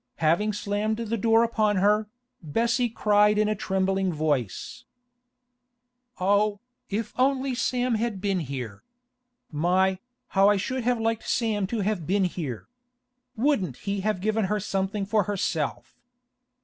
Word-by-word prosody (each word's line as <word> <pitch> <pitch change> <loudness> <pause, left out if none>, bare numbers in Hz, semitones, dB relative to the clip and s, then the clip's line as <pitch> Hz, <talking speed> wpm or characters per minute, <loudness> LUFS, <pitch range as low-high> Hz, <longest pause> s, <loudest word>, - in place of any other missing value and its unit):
Having 170 +7 +2
slammed 205 +2 -1
the 230 -1 -2
door 225 +1 +4
upon 215 -3 +1
her, 210 +3 +3 0.3
Bessie 235 - 0
cried 210 -1 +3
in 215 0 +3
a 215 - +1
trembling 190 -1 0
voice: 145 - -2 1.4
'Oh, 205 +2 +2 0.3
if 215 +2 -3
only 265 0 +2
Sam 250 0 0
had 220 -2 -1
been 195 -1 0
here! 125 -9 -6 0.7
My, 185 +4 +2 0.3
how 195 +1 +4
I 205 - +3
should 255 +6 -2
have 245 -1 +2
liked 225 0 -1
Sam 215 -4 0
to 220 +1 -2
have 195 -5 -2
been 195 +2 +2
here! 160 -10 -4 0.7
Wouldn't 220 - 0
he 200 0 -1
have 200 -2 -1
given 215 +1 +1
her 210 +2 0
something 195 0 -2
for 210 -1 +1
herself! 185 -7 -3
205 Hz, 135 wpm, -26 LUFS, 185-220 Hz, 1.4 s, door